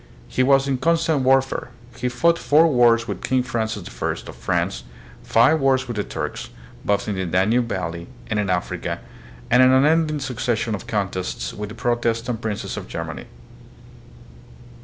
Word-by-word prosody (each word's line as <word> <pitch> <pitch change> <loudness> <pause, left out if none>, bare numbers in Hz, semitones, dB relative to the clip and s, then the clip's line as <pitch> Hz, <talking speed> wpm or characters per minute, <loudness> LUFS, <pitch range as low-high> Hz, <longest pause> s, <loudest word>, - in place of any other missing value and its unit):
He 130 - -1
was 135 +1 +4
in 135 -2 0
constant 165 -2 +2
warfare. 130 -1 +2 0.3
He 125 0 -2
fought 170 +7 +2
four 155 +3 +4
wars 120 -4 +4
with - - -5
King 130 -1 +1
Francis 110 -5 -3
I. - - 0 0.2
of - - -9
France, - - -1 0.4
five 125 +8 +4
wars 135 -2 +2
with 120 - -4
the 105 - -1
Turks, - - -5 0.3
both 100 0 0
in 105 - -1
the 95 -1 -2
Danube 105 +7 +2
valley 85 -3 -4 0.2
and 105 -2 -1
in 100 -2 -1
Africa, 90 -1 -2 0.5
and 125 +2 +6
an 130 0 +6
unending 155 +3 +3
succession 120 -4 -2
of 100 - -5
contests 95 - -3
with 105 -1 -6
the 110 - -9
Protestant 120 -1 -1
princes 110 -3 -4
of - - -6
Germany. - - -6
120 Hz, 160 wpm, -22 LUFS, 105-135 Hz, 0.5 s, and